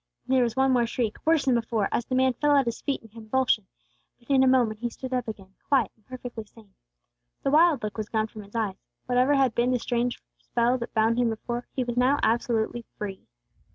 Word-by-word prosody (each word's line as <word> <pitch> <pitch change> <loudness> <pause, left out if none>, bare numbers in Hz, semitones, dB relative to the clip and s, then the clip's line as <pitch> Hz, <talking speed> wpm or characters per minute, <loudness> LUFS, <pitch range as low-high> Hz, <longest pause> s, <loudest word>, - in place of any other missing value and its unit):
There 260 0 +3
was 235 -2 0
one 265 0 +3
more 240 -2 +3
shriek, 230 -2 -2
worse 320 -2 +3
than 260 - +3
before, 225 -3 0
as 240 - -1
the 255 - -1
man 260 0 +3
fell 290 +4 +2
at 275 -2 +4
His 235 -1 -3
feet 280 -2 -2
in 225 - -15
a - - -34
convulsion; 225 -2 0 0.5
but 245 +3 -9
in 270 -1 +5
a 265 - +5
moment 240 -5 +3
he 240 +1 -2
stood 260 +2 -7
up 250 -2 -1
again, 195 -3 -8
quiet 260 -8 +2
and 220 - -33
perfectly 245 -3 -7
sane. 210 -1 -19 0.7
The 275 - +1
wild 310 -4 +4
look 210 -2 -4
was 215 - -4
gone 220 -1 +1
from 220 -1 -10
his 200 +2 -15
eyes. 205 -4 -2 0.2
Whatever 250 +3 +3
had 265 -4 +3
been 240 +2 +1
the 255 - +2
strange 240 0 -1 0.2
spell 240 +2 +1
that 235 - -5
had - - -44
bound 225 +2 +3
him 240 -1 +3
before, 240 +2 -4
he 255 - 0
was 240 0 -4
now 260 +3 +4
absolutely 235 0 0
free. 195 -2 -6
240 Hz, 235 wpm, -26 LUFS, 220-260 Hz, 0.7 s, in